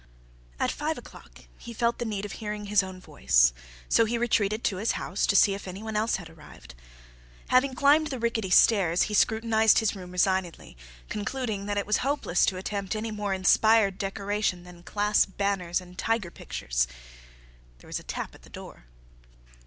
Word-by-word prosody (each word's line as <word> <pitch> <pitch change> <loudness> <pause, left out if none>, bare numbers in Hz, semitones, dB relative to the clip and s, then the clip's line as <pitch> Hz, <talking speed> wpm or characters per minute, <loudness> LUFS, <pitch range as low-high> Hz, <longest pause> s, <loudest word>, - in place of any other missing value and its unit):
At - - +1
five 310 +1 -3
o'clock - - -13 0.2
he 235 - -9
felt 235 +1 0
the 240 - -2
need 210 -2 -3
of 205 - -7
hearing 210 -1 -5
his 205 0 +3
own 190 -1 -8
voice, - - +3 0.3
so 225 - +4
he 235 +2 -1
retreated 220 -2 0
to 190 - 0
his 215 +5 0
house 185 - -2
to 200 - +2
see 200 0 +5
if 195 0 -7
any 190 +3 -7
one 220 -1 -5
else 220 +2 +1
had 180 -3 -7
arrived. 150 - -15 0.8
Having 255 +1 +3
climbed 295 +4 +4
the 270 -3 -4
rickety 230 -4 -1
stairs 180 -2 +4
he 210 - -4
scrutinized 220 +1 +3
his 220 -2 +1
room 180 -2 -9
resignedly, 180 - -1 0.3
concluding 215 -2 -4
that 205 0 -2
it 200 - -1
was 210 - +2
hopeless 275 - 0
to 185 - 0
attempt 200 +1 -4
any 220 +1 -3
more 210 -1 -3
inspired 200 +1 +3
decoration 200 -2 -2
than 180 -1 -14
class 210 +3 +1
banners 195 -3 -1
and 180 0 -13
tiger 225 -6 -1
pictures. - - -2 0.9
There - - -18
was - - -4
a - - -14
tap - - -5
at - - -17
the - - -17
door. - - -11
205 Hz, 185 wpm, -27 LUFS, 185-220 Hz, 0.9 s, see